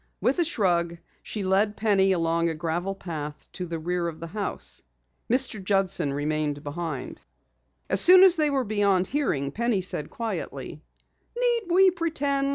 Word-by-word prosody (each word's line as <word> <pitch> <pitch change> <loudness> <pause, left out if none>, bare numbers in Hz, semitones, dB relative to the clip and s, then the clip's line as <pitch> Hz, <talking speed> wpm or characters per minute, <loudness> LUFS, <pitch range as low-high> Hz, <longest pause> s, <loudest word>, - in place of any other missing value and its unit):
With 270 +7 +1
a - - +4
shrug 175 - +1 0.2
she 210 - -5
led 200 +3 +1
Penny 195 -3 +3
along 170 -1 +1
a 160 - -3
gravel 170 +5 -2
path 150 -5 -7
to 180 - -5
the 165 0 -4
rear 175 +2 -2
of 160 -2 -6
the 165 - -6
house. 160 - -3 0.5
Mr. 245 -5 +1
Judson 185 -6 +1
remained 145 0 -2
behind. 150 -2 -5 0.7
As 190 +1 0
soon 370 +1 +8
as 375 -2 +7
they 305 -3 +2
were 275 -2 +1
beyond 200 -4 +2
hearing, 160 - -1
Penny 235 - 0
said 155 -5 -2
quietly: 165 - -5 0.6
"Need 485 -1 +2
we 375 +2 +6
pretend? 285 -5 -1
190 Hz, 160 wpm, -26 LUFS, 165-245 Hz, 0.7 s, soon